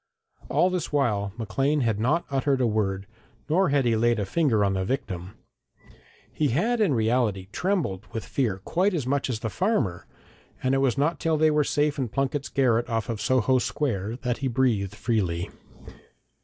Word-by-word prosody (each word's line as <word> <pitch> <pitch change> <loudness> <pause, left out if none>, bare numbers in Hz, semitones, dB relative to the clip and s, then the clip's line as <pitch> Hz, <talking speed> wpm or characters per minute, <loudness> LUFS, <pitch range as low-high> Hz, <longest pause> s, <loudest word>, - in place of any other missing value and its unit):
All 185 - +3
this 180 -3 -2
while 105 -9 +1
Maclean 135 +7 0
had 115 -4 0
not 150 +10 +1
uttered 135 0 +1
a 125 - +2
word, 100 -3 0 0.4
nor 175 +3 +3
had 140 -2 +2
he 115 -1 +3
laid 120 +1 +2
a 100 - -1
finger 115 - +2
on 100 - +1
the 95 -1 -1
victim. 95 -5 -4 1.0
He 150 - +1
had 220 - +1
in 175 -11 +3
reality 110 -4 0
trembled 150 - -1
with 115 - -5
fear 115 -9 -1
quite 185 +3 +1
as 150 -7 -2
much 140 +1 0
as 115 -3 -3
the 110 - -2
farmer, 160 - -1 0.6
and 130 +1 +2
it 135 - +3
was 135 -1 +1
not 150 +3 +1
till 160 -1 +1
they 155 0 +4
were 150 0 +3
safe 145 +1 0
in 130 -3 -1
Plunket's 135 +3 -2
garret 120 -3 +1
off 115 -1 -2
Soho 130 0 +3
Square 115 -6 -2
that 125 -1 -1
he 135 - -1
breathed 115 -6 0
freely. 95 -7 -1
125 Hz, 180 wpm, -26 LUFS, 110-145 Hz, 1.0 s, they